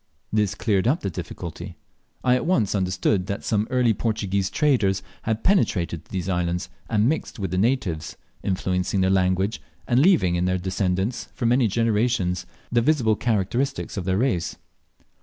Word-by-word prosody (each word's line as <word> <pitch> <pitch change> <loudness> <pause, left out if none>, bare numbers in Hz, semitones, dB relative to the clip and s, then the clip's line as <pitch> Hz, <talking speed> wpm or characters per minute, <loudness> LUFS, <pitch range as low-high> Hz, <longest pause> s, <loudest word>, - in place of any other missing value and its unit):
This 105 -2 +1
cleared 105 -2 +1
up 145 +7 +2
the 100 - -2
difficulty. - - -7 0.5
I 125 - +4
at 125 - 0
once 115 - +2
understood 95 0 0
that 100 - -3
some 105 0 0
early 125 -3 +3
Portuguese 100 -3 -1
traders 100 -10 +2 0.3
had 110 0 -1
penetrated 90 - +1
to - - -25
these 95 -2 -3
islands, 90 0 -1 0.2
and 110 0 +3
mixed 160 +4 -2
with 95 -5 -3
the 90 - 0
natives, 105 -8 0 0.2
influencing 95 0 0
their 95 0 +3
language, 95 +2 +1 0.3
and 120 0 +3
leaving 150 - +4
in 90 +1 +1
their 90 0 +1
descendants 95 +4 -1
for 120 - -3
many 120 +1 +4
generations 105 -4 0 0.2
the 120 0 +3
visible 120 -5 +3
characteristics 120 +6 -1
of 95 -4 -3
their 95 0 +1
race. 105 -8 0
100 Hz, 160 wpm, -24 LUFS, 95-120 Hz, 0.5 s, I